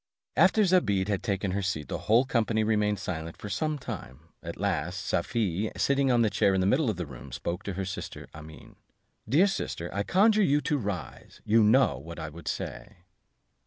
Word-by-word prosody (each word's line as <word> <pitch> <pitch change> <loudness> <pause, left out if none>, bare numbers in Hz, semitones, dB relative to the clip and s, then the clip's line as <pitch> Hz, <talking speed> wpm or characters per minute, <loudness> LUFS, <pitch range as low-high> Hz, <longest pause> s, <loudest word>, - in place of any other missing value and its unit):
After 215 - +5
Zobeide 105 - +2
had 100 -2 0
taken 100 -1 -1
her 100 +2 -1
seat, 90 -6 -2
the - - -4
whole 115 +4 +5
company 115 -3 +1
remained 105 -1 +1
silent 80 -3 -5
for 105 - -8
some 150 +10 -1
time; 75 - -8
at - - -7
last, 90 +4 -2
Safie, 105 +1 -1
sitting 140 -1 +2
on 120 -2 +4
a - - +2
chair 95 0 +2
in - - +1
the 95 - +1
middle 130 +6 +2
of 105 - -2
the 90 - -3
room, 65 -1 -11
spoke 85 +7 -4
to 100 - -3
her 95 +1 -3
sister 100 - -6
Amene, 80 0 -12 0.5
"Dear 155 - +5
sister, 85 - -3
I 100 - -1
conjure 210 - +4
you 145 -6 +3
to 145 +1 0
rise; 100 - -6
you 110 +2 +4
know 105 - +4
what 85 +4 -9
I 80 -2 -5
would 85 +3 -12
say." 100 -4 -6
100 Hz, 200 wpm, -28 LUFS, 85-120 Hz, 0.5 s, After